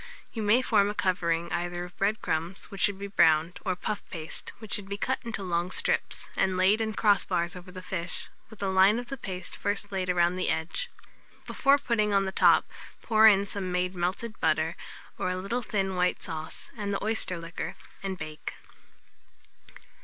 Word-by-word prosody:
You 225 - -3
may 215 +5 +4
form 205 -5 +3
a 210 - -4
covering 170 -3 0
either 175 0 -2
of 175 - -13
bread 210 +2 0
crumbs, 170 +6 -2
which 195 - -6
should 205 -2 +3
be 200 - -5
browned, 165 -3 +3
or 185 -3 0
puff 205 +3 -3
paste, 160 -1 -5
which 220 -1 -7
should 195 -1 -2
be 200 - -3
cut 260 +5 0
into 220 -4 -4
long 175 -1 0
strips, - - 0
and 190 -1 +1
laid 195 +4 +4
in 220 -1 -1
cross 205 -2 +4
bars 175 -1 -1
over 180 +1 -10
the 185 0 -9
fish, 175 -1 -4 0.2
with 220 -2 -9
a - - +1
line 190 +3 +5
of 240 0 -5
the 275 - -4
paste 185 -6 -6
first 205 0 -2
laid 185 -2 -2
round 175 0 +2
the 185 - +1
edge. 160 - -1 0.6
Before 275 +1 +4
putting 225 -6 +1
on 195 0 +3
the 190 - -2
top, - - +5 0.4
pour 220 -1 +6
in 200 -2 +6
some 195 -2 -4
made 180 +1 0
melted 190 +6 -3
butter, 160 +1 +1 0.4
or - - 0
a 185 - -1
little 200 +7 -2
thin 195 -4 -1
white 180 0 +1
sauce, 160 -2 -5
and 205 -3 -3
the 200 - -2
oyster 215 -4 0
liquor, 165 +1 -5 0.3
and 195 -1 -3
bake. 155 -2 -6
190 Hz, 195 wpm, -28 LUFS, 175-210 Hz, 0.6 s, pour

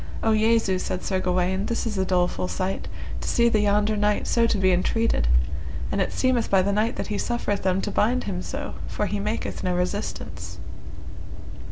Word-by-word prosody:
O 225 - +3
Jesu! 220 -3 +3
said 185 - -3
Sir 190 -2 0
Gawaine, 185 +2 0
this 235 - -1
is 220 -2 -2
a 190 - +1
doleful 180 -1 +1
sight, 190 +1 -2 0.3
to - - -3
see 235 0 +4
the 220 - +2
yonder 210 +1 +2
knight 210 0 +1
so 230 -1 +3
to 225 - +1
be 190 -1 +3
entreated, 185 - +1 0.6
and - - +1
it - - 0
seemeth 255 -3 +1
by 190 -1 +4
the 200 +1 +1
knight 220 +4 +1
that - - -3
he 205 - -1
suffereth 235 -4 -1
them 190 0 +1
to - - -3
bind 245 +4 +2
him 185 -3 -3
so, 280 +8 -5
for 210 - -1
he 205 0 -2
maketh 210 +3 -3
no 180 -1 0
resistance. 180 +4 -3
205 Hz, 195 wpm, -25 LUFS, 185-225 Hz, 0.6 s, see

